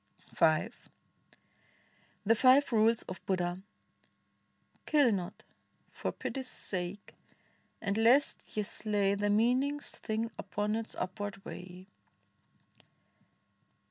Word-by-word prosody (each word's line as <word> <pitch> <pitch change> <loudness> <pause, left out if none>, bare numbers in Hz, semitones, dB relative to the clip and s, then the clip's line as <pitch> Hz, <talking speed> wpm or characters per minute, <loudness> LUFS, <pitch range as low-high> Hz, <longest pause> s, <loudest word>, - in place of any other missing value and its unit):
V 160 +5 +3 1.6
THE 220 - +5
FIVE 260 +5 +5
RULES 225 +1 +3
OF 185 - -8
BUDDHA 180 -1 -1 1.3
Kill 290 -6 +4
not 185 -4 -4 0.2
— - - -40
for - - -3
Pity's 265 -2 -5
sake 190 -3 -5 0.3
— - - -39
and 200 -1 0
lest 250 +6 +4 0.2
ye 210 - +2
slay 205 -1 0
The 205 +1 0
meanest 255 +7 +1
thing 225 +1 -3
upon 210 +1 -2
its 225 0 -5
upward 200 +1 -5
way. 180 +1 -9
210 Hz, 105 wpm, -32 LUFS, 190-230 Hz, 1.6 s, THE